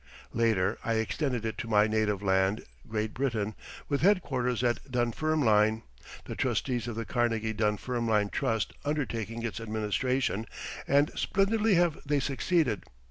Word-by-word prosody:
Later 110 -4 +2
I 115 - 0
extended 120 +2 -1
it 110 - -3
to - - -4
my 105 -2 +4
native 105 -2 0
land, 95 +1 +2 0.2
Great 110 0 -2
Britain, 115 -5 -1 0.3
with 140 -1 0
headquarters 130 - +2
at 120 +2 -1
Dunfermline 120 -3 +2 0.4
the - - -5
Trustees 120 -3 -1
of 120 - -4
the 115 0 -3
Carnegie 115 -2 0
Dunfermline 110 0 0
Trust 115 -4 -1
undertaking 115 -6 -2
its 115 -1 -3
administration, 110 +1 -1 0.4
and 145 +2 +3
splendidly 210 +1 +2
have 170 -2 +2
they 145 0 +1
succeeded. 135 - +1
115 Hz, 135 wpm, -29 LUFS, 110-135 Hz, 0.4 s, my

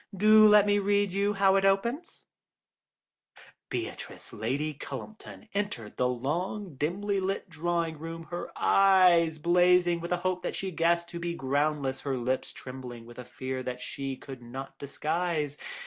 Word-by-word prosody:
Do 215 +2 +7
let 210 -1 +7
me 205 0 +3
read 200 0 +1
you 200 +2 +1
how 195 -1 +4
it 195 - +1
opens: 235 - 0 1.5
"'Beatrice - - -6
Lady 140 +7 -2
Cullumpton 215 +9 -9
entered 200 - -3
the 125 - +1
long, 165 - -3
dimly 195 +9 -1
lit 190 0 -3
drawing 165 -1 -2
room, 165 +1 -6
her 175 - -4
eyes 180 -4 +5
blazing 175 +1 +3
with 170 +1 -6
a 180 - +2
hope 185 -1 0
that - - -3
she 190 -1 -4
guessed 170 +1 +1
to 170 - -6
be 170 0 -3
groundless, 140 -1 -1
her 135 -2 -2
lips 125 +2 -2
trembling 125 -3 -9
with 120 +1 -12
a 125 - -7
fear 130 +1 -5
that 125 0 -5
she 135 +1 -5
could 130 -1 -10
not 135 +3 -8
disguise. 155 +1 -2
170 Hz, 155 wpm, -28 LUFS, 135-195 Hz, 1.5 s, Do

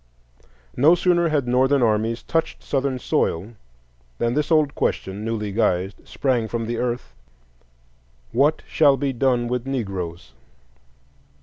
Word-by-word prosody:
No 155 +7 +5
sooner 175 -1 +2
had 145 -5 0
Northern 130 +2 +3
armies 110 +1 0
touched 165 -1 -2
Southern 135 -1 -1
soil 105 -3 -1 0.6
than 120 0 0
this 150 +2 0
old 155 -3 +3
question, 95 +2 -2
newly 110 -2 -3
guised, 95 -2 -1
sprang 125 -5 0
from 115 0 -3
the 120 +1 -3
earth,—What - - -4
shall 145 -3 +4
be 135 0 -1
done 125 -1 +1
with 125 +1 -3
Negroes? 90 - -4
120 Hz, 120 wpm, -22 LUFS, 95-135 Hz, 0.6 s, No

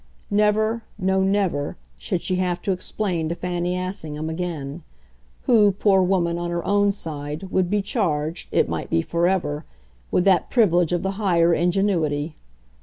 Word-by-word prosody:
Never, 215 +2 +2 0.2
no 190 +1 +1
never, 190 -7 0 0.2
should 60 - -2
she 185 - -1
have 180 -1 0
to 195 - 0
explain 180 -3 -2
to 170 - -2
Fanny 180 0 -2
Assingham 160 -4 -4
again 160 -3 -4 0.6
who, 215 -4 +5
poor 195 -1 +3
woman, 175 -2 +1
on 175 0 -3
her 170 0 -3
own 205 0 +3
side, 150 -4 -5
would 185 -2 +1
be 205 0 +1
charged, 165 - -1
it - - +3
might - - -4
be 80 - +1
forever, 170 -3 0 0.5
with 180 - +1
that 190 -3 +3
privilege 180 -8 +3
of 175 -1 0
the 195 0 -2
higher 170 -4 +3
ingenuity. 170 -4 0
180 Hz, 155 wpm, -23 LUFS, 165-195 Hz, 0.6 s, who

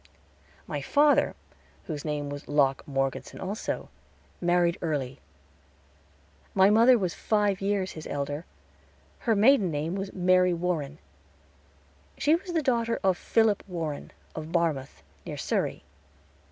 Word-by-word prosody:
My - - -4
father, 290 0 +3 0.5
whose 150 -3 -5
name 150 -2 -3
was 145 0 -7
Locke 140 -2 +2
Morgeson 135 -1 -2
also, 200 +4 -4 0.5
married 175 -1 +2
early. 140 -6 -2 1.4
My 195 +1 +6
mother 235 +4 +6
was 185 -6 -1
five 205 -1 0
years 195 -1 0
his 155 - -8
elder; 145 +3 -4 0.8
her 225 - +5
maiden 215 -2 +5
name 155 +2 -2
was 195 0 -4
Mary 180 -1 +3
Warren. 165 -4 -2 1.2
She 300 - +3
was 350 +2 -1
the 325 -2 +1
daughter 235 -3 +1
of 190 -1 +3
Philip 220 +1 +2
Warren, 165 -5 -4 0.2
of 155 0 -7
Barmouth, 160 -6 -1 0.2
near - - -6
Surrey. - - -1
180 Hz, 125 wpm, -27 LUFS, 150-205 Hz, 1.4 s, My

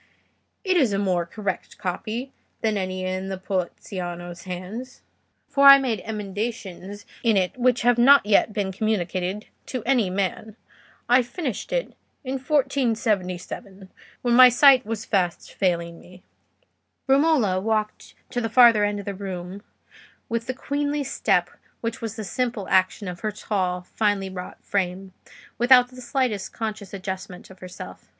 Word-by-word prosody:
It 375 -3 +2
is 255 -10 +3
a - - +1
more 180 -4 0
correct 200 0 -5
copy 215 +7 -4 0.3
than 220 -2 +1
any 185 -1 -3
in 185 +1 -3
Poliziano's 175 -2 -5
hands, 190 +8 -7 0.4
for 280 0 +4
I 275 0 +12
made 255 -5 -1
emendations 205 -2 -5 0.2
in 225 -4 +3
it 185 -1 0
which 250 -1 +2
have 240 0 +3
not 275 +2 +7
yet 210 +1 +3
been 205 -2 -2
communicated 190 -1 -2 0.2
to 255 -4 -4
any 235 -6 +2
man. 200 +3 -3 0.5
I 245 +2 +5
finished 255 - -5
it - - -1 0.3
in 265 0 -3
1477, 220 - -1 0.3
when 240 -1 +2
my 255 +1 +9
sight 255 -1 +6
was 225 -1 -4
fast 180 -4 -1
failing 170 -3 -1
me." 180 0 -16 0.8
Romola 270 - +3
walked 215 0 -2 0.2
to 245 - -1
the 225 - -2
farther 230 -3 +6
end 205 0 0
of 200 - -7
the 200 - -3
room, 190 0 -6 0.7
with 230 -2 -3
the 255 - -3
queenly 285 +2 -2
step 275 - +1 0.3
which 230 -1 -4
was 225 -2 -4
the 220 - -5
simple 235 -1 -2
action 185 +2 +2
of 175 -1 -6
her 215 - -2
tall, 185 -3 -2
finely 200 0 -1
wrought 180 -1 -9
frame, 190 -1 -2 0.5
without 250 0 +6
the 255 0 -12
slightest 240 -6 -1
conscious 215 -3 -5
adjustment 190 -2 -7
of 190 - -15
herself. 180 -1 -10
210 Hz, 145 wpm, -24 LUFS, 185-245 Hz, 0.8 s, I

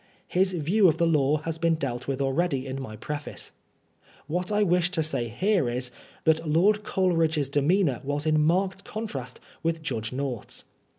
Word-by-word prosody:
His 185 +1 +2
view 180 +5 +3
of 160 -2 +3
the 170 - +3
law 150 -2 +3
has 160 +2 -5
been 165 -1 +3
dealt 130 -5 -4
with 135 0 -2
already 135 0 0
in 135 0 -4
my 110 -5 -7
Preface. 145 +6 -6 0.7
What 180 +6 -2
I 210 0 +3
wish 180 -2 +2
to 170 -4 0
say 125 -6 -1
here 180 - +1
is, 125 +1 -2 0.3
that 160 -1 +4
Loid 200 +7 +4
Coleridge's 165 -8 +1
demeanor 145 0 +2
was 145 +2 -2
in 155 -1 +3
marked 190 +4 +1
contrast 140 - -6 0.2
with 165 -1 -1
Judge 110 -8 -2
North's. 130 -3 -5
155 Hz, 170 wpm, -26 LUFS, 135-180 Hz, 0.7 s, that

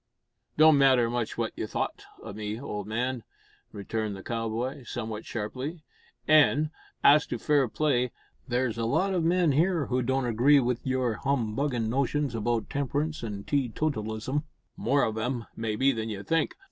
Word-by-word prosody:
"It - - -38
don't 155 -2 +7
matter 130 -4 +4
much 120 -2 -2
what - - -2
you - - -3
thowt - - -3 0.2
o' - - -7
me, 105 +1 -4
old 105 -6 -5
man," 120 +2 -2 0.5
returned 105 +1 -3
the 95 - -9
cowboy, 115 +4 -3
somewhat 110 -3 -5
sharply; 130 +9 -5 0.4
"an', 155 0 +5 0.3
as 150 +2 +6
to - - -3
fair 145 -4 +2
play, 125 -1 +1 0.4
there's 120 -2 -1
a 115 - 0
lot 190 +12 +1
of 175 -3 +1
men 170 -1 +3
here 165 +2 +2
who 125 0 0
don't 130 +1 0
agree 125 +5 +5
wi' 125 -2 0
your 130 -4 0
humbuggin' 125 -2 0
notions 140 +2 0
about 115 0 -1
temperance 145 +2 -2
an' 105 -3 -5
tee 140 -1 0
totalism 115 0 -2 0.3
more 140 +4 +2
of 110 0 -1
'em, 120 0 -2
maybe, 115 +4 +1
than 115 -3 -3
you 100 -2 -5
think. 165 +4 0
125 Hz, 165 wpm, -28 LUFS, 110-145 Hz, 0.5 s, don't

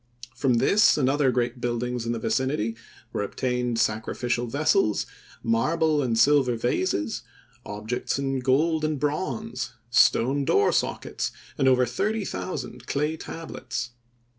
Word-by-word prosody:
From 125 0 +2
this 200 - +4
and 135 -4 +2
other 140 0 +3
great 120 0 -1
buildings 120 0 -2
in - - 0
the 120 - -1
vicinity 115 -1 -1 0.4
were - - -1
obtained 125 +2 -1
sacrificial 120 +2 -1
vessels, 145 - +2 0.4
marble 150 +7 +2
and 120 -4 0
silver 135 0 +4
vases, 115 - -1 0.5
objects 105 +6 -3
in 135 -1 -1
gold 155 +5 +2
and 155 -2 0
bronze, 185 - -2 0.2
stone 135 +3 +4
door 100 -6 +3
sockets - - -1 0.2
and 135 - +1
over 130 -1 +5
thirty 205 - -1
thousand 125 -11 -5
clay 150 +3 0
tablets. 125 -7 -6
130 Hz, 130 wpm, -26 LUFS, 120-150 Hz, 0.5 s, over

